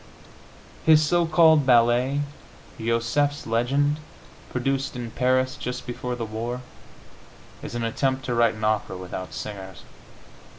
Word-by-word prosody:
His 155 -1 +7
so 175 +1 +2
called 160 -2 +5
ballet, 125 +2 +3 0.6
"Josefs 115 +6 0
Legend," 140 +6 +1 0.5
produced 135 +2 -1
in 120 -2 -5
Paris 130 +1 +1
just 125 0 -5
before 125 0 -4
the 120 -2 -4
war, 115 +3 -4 1.0
is - - -7
an 120 - -2
attempt 130 +3 -1
to 125 - -1
write 120 -1 +3
an 110 - -8
opera 105 -3 0
without 95 0 -6
singers. 95 -3 -7
125 Hz, 125 wpm, -25 LUFS, 115-135 Hz, 1.0 s, His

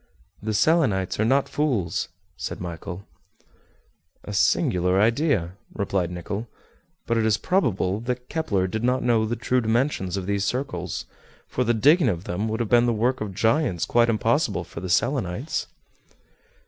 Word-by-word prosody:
"The 110 0 -2
Selenites 105 - +2
are 110 - +3
not 135 +4 +3
fools," 120 - -1 0.3
said - - -5
Michel. 90 +2 -6 1.2
"A 105 - -7
singular 90 -1 +2
idea," 115 - +2 0.2
replied 95 -4 -1
Nicholl; 100 +6 -5 0.6
"but 115 - 0
it - - +1
is 110 -1 +3
probable 110 - 0
that 125 +1 -4
Kepler 105 - 0
did 110 +4 -3
not 125 +1 +1
know 115 -2 +2
the 120 - -1
true 125 +1 0
dimensions 110 -5 0
of 95 - -3
these 100 0 0
circles, 100 -7 -3 0.4
for 125 - -1
the 120 0 +1
digging 145 - +5
of 90 -3 -2
them 100 +4 -2
would 110 +2 -2
have 115 - -1
been 120 0 +5
the 120 - +2
work 125 +4 0
of 100 -3 -4
giants 110 - +1
quite 120 0 +3
impossible 110 -3 +1
for - - -9
the 95 - -5
Selenites." 120 - 0
110 Hz, 160 wpm, -24 LUFS, 95-125 Hz, 1.2 s, digging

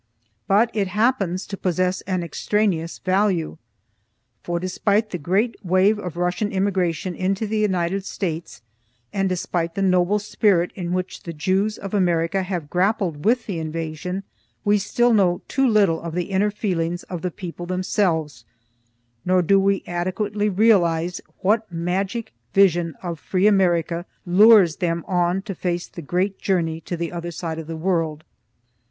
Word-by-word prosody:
But 220 +4 +3
it 205 -3 0
happens 195 -3 0
to 200 - -6
possess 185 0 0
an 185 -2 -1
extraneous 170 0 -1
value. 185 -4 0 0.8
For, 175 0 -2
despite 200 +4 0
the 180 - -3
great 195 +10 +1
wave 190 +4 +3
of 180 -4 -6
Russian 180 +4 -1
immigration 190 -2 0
into 190 +4 -1
the 215 +1 -1
United 190 -2 0
States, 165 - -4 0.5
and 195 -1 +1
despite 175 -2 -2
the 195 - 0
noble 185 +1 +3
spirit 200 -4 +1
in 175 -2 -4
which 185 0 -3
the 170 - -7
Jews 190 +7 0
of 195 0 -7
America 175 -1 +1
have 180 -5 -4
grappled 180 -3 0
with 235 +1 +3
the 185 -6 -3
invasion, 165 +4 -4 0.4
we 205 0 +4
still 240 +4 +2
know 185 -5 +2
too 270 -1 +2
little 200 -8 +3
of 170 -1 -6
the 180 +2 -2
inner 195 +2 +2
feelings 175 -5 -2
of 180 -3 -6
the 180 - -1
people 175 0 -7
themselves, 180 - -1 0.8
nor 185 0 +3
do 195 +4 +4
we 195 0 +1
adequately 205 +4 -1
realize 180 -5 +2 0.2
what 215 +1 +1
magic 190 +6 -2 0.2
vision 175 -5 +3
of 170 -3 -4
free 185 +3 0
America 175 -4 +2 0.2
lures 190 -2 +6
them 170 -1 -1
on 180 0 +1
to 200 - -5
face 175 -1 -2
the 170 - -9
great 185 +6 -1
journey 165 -4 0
to 175 - -5
the 170 0 -3
other 175 0 -5
side 165 -1 -5
of 160 - -7
the 165 -1 -5
world. 160 -3 -1
185 Hz, 155 wpm, -22 LUFS, 170-200 Hz, 0.8 s, lures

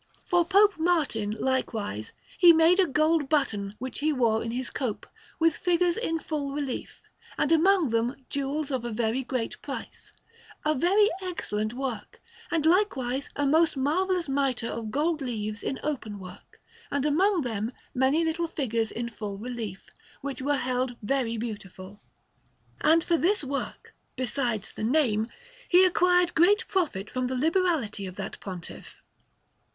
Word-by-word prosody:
For 350 -1 +3
Pope 395 +1 +4
Martin, 290 -12 +1
likewise, 220 - -2 0.3
he 345 -2 +9
made 330 +3 +5
a 375 - +5
gold 310 0 +2
button 210 -10 0
which 260 +2 -6
he 310 +2 +1
wore 230 -5 +2
in 230 - -4
his 245 +2 -3
cope, 245 -6 -3 0.3
with 330 -1 +3
figures 350 -1 +2
in 330 -8 -1
full 295 -3 -3
relief, 280 -3 -4 0.4
and 295 - +1
among 330 - +4
them 230 +3 +1
jewels 280 +1 -2
of 260 -2 0
very 235 +1 -1
great 250 -2 -3
price - - -7 0.5
a 305 - +3
very 390 +9 +3
excellent 215 - -3
work; 250 -6 -5 0.3
and 325 -3 0
likewise 280 -8 +1
a 285 - 0
most 315 +1 +3
marvellous 350 +5 +1
mitre 270 -3 0
of 225 -2 -4
gold 305 +5 0
leaves 215 -5 -3
in 265 - -3
open 250 -9 -3
work, 185 0 -12 0.3
and 280 0 -1
among 360 +5 +3
them 225 -1 -2 0.2
many 270 +6 +2
little 335 +1 -1
figures 230 -8 -1
in 235 +1 -3
full 210 -4 -6
relief, 220 -4 -6 0.3
which 275 -1 -5
were 285 +1 +1
held 250 -1 -1
very 235 -1 0
beautiful. 205 -3 -7 0.8
And 325 +1 +4
for 340 -1 +2
this 365 +4 +1
work, 275 0 -5 0.2
besides 245 -4 -2
the - - -7
name, 230 -4 +2 0.4
he 365 +1 +7
acquired 360 0 +3
great 370 +6 +4
profit 305 - -1
from 255 0 -2
the 260 0 -2
liberality 305 - +1
of 185 - -8
that - - -6
Pontiff. 180 -4 -9
275 Hz, 150 wpm, -27 LUFS, 230-330 Hz, 0.8 s, he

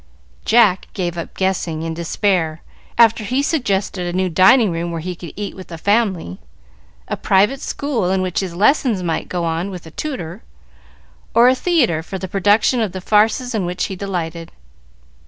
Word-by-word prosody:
Jack 215 -5 +4
gave 175 -3 -2
up 170 - -6
guessing, 180 -4 -1
in 165 0 -3
despair, 165 -1 -1 0.3
after 225 -1 +5
he 210 +5 -3
had 280 - +2
suggested 195 - -1
a 175 +1 -2
new 185 0 +1
dining 190 +5 +5
room 170 +1 -3
where 165 - -3
he 180 +2 -5
could 170 -1 -9
eat 205 0 -5
with 185 - -10
the 165 - -8
family, 195 - 0 0.7
a - - -2
private 205 +8 +2
school 250 -10 -2
in 190 0 +1
which 185 -2 -1
his 185 -3 -4
lessons 215 - +2
might 165 -2 -2
go 175 -2 -2
on 165 +3 -2
with 180 -4 -8
a 160 - -11
tutor, 255 - -5 0.9
or 235 +1 +7
a 255 - +6
theatre 260 - +1
for 190 +4 -6
the 190 - -5
production 205 +6 +2
of 210 -5 -1
the 190 - -4
farces 220 +6 +2
in 215 -4 0
which 180 +1 -2
he 190 - -5
delighted. 170 -4 -4
190 Hz, 185 wpm, -19 LUFS, 175-220 Hz, 0.9 s, or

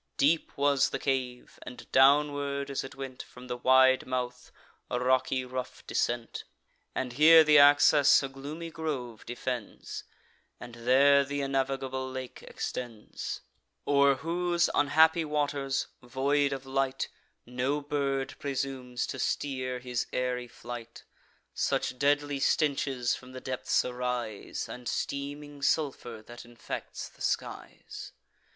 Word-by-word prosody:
Deep 155 +4 +2
was 140 -1 +3
the - - -2
cave; 130 -3 -3
and, 125 - -10
downward 140 0 +3
as 135 - -2
it 135 0 -9
went 135 -1 -7
From 125 0 -13
the 125 -1 -4
wide 130 +1 +5
mouth, 125 -1 -4 0.4
a 125 - -1
rocky 130 0 +1
rough 125 0 -6
descent; 120 -1 -2 0.5
And 125 -2 -2
here 160 +4 +8
th' 150 -1 +6
access 145 0 +6
a - - -1
gloomy 145 +5 -7
grove 140 -9 -4
defends, 120 -1 -5 0.6
And 120 -1 -10
there 135 +4 +5
th' 140 +1 -7
unnavigable 135 -1 -2
lake 130 -1 -7
extends, 115 -4 -6 0.4
O'er 140 -1 +4
whose 175 +4 0
unhappy 160 +3 +4
waters, 145 -3 -1 0.2
void 140 +3 +1
of 135 -1 -5
light, 135 0 -1 0.4
No 125 +4 -1
bird 140 -2 -2
presumes 130 -3 -3
to 130 - -6
steer 130 -2 -2
his 125 -1 -3
airy 125 -1 -2
flight; 120 0 -9 0.5
Such 125 - -1
deadly 145 0 +1
stenches 135 -4 +1
from 130 0 -8
the 130 - -6
depths 130 0 0
arise, 125 -4 -3
And 125 -1 -8
steaming 145 +1 -4
sulphur, 130 -7 -1
that 120 0 -10
infects 120 -1 -7
the - - -20
skies. - - -4
135 Hz, 125 wpm, -29 LUFS, 125-145 Hz, 0.6 s, here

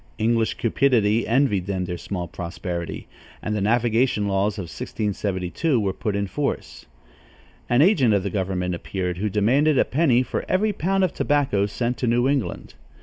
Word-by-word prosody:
English 115 0 +1
cupidity 115 -3 +2
envied 115 -7 +2
them 95 -2 -2
their 90 0 -4
small 90 0 -5
prosperity, 85 0 -5 0.4
and 105 - -2
the 105 - -1
navigation 115 0 +2
laws 100 +1 0
of 100 - -3
1672 100 - -2
were 100 -3 -1
put 105 0 -3
in 100 0 0
force. 140 +8 -4 0.8
An 120 +4 +5
agent 155 - +4
of 100 -2 +2
the 100 - -3
government 90 -2 -1
appeared, 90 0 -3
who 105 +2 0
demanded 130 +9 +2
a - - +4
penny 130 -4 +2
for 130 - -3
every 205 +3 +2
pound 195 +3 0
of 185 - +1
tobacco 135 -9 +1
sent 120 +4 -2
to 125 - -1
New 120 +2 +2
England. 140 -4 -2
110 Hz, 165 wpm, -23 LUFS, 95-130 Hz, 0.8 s, An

